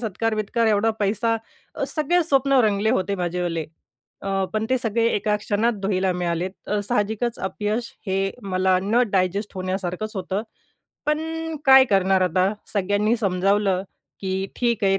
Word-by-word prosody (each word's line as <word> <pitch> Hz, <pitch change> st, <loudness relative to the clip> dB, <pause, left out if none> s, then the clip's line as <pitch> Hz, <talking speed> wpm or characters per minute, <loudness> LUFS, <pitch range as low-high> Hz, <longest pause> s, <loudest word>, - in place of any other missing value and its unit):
सत्कार-बित्कार, 225 Hz, +1 st, -1 dB
एवढा 220 Hz, +1 st, +3 dB
पैसा 225 Hz, +3 st, +1 dB, 0.5 s
सगळे 340 Hz, +3 st, +1 dB
स्वप्न 275 Hz, -3 st, +3 dB
रंगले 210 Hz, +1 st, +2 dB
होते 200 Hz, -5 st, 0 dB
माझेवाले. 175 Hz, -2 st, -2 dB, 0.6 s
अ, 195 Hz, 0 st, 0 dB
पण 215 Hz, 0 st, -1 dB
ते 260 Hz, -, +3 dB
सगळे 230 Hz, -1 st, 0 dB
एका 210 Hz, 0 st, +1 dB
क्षणात 210 Hz, +3 st, 0 dB
धुळीला 190 Hz, -1 st, +1 dB
मिळालेत. 175 Hz, 0 st, -1 dB, 0.2 s
अ, 210 Hz, 0 st, 0 dB
साहजिकच 220 Hz, +1 st, 0 dB
अपयश 210 Hz, +5 st, -3 dB
हे 195 Hz, 0 st, 0 dB
मला 185 Hz, -1 st, +2 dB
न 230 Hz, +5 st, +3 dB
डायजेस्ट 195 Hz, +2 st, 0 dB
होण्यासारखंच 185 Hz, +2 st, -3 dB
होतं. 190 Hz, +2 st, -2 dB, 0.6 s
पण 300 Hz, 0 st, +2 dB, 0.5 s
काय 265 Hz, -1 st, +8 dB
करणार 190 Hz, -1 st, +3 dB
आता 185 Hz, +2 st, +2 dB, 0.2 s
सगळ्यांनी 205 Hz, +3 st, +1 dB
समजावलं 195 Hz, -1 st, +1 dB, 0.4 s
की 190 Hz, 0 st, -2 dB
"ठीक 235 Hz, -3 st, 0 dB
आहे, 195 Hz, 0 st, +3 dB
200 Hz, 135 wpm, -23 LUFS, 190-225 Hz, 0.6 s, काय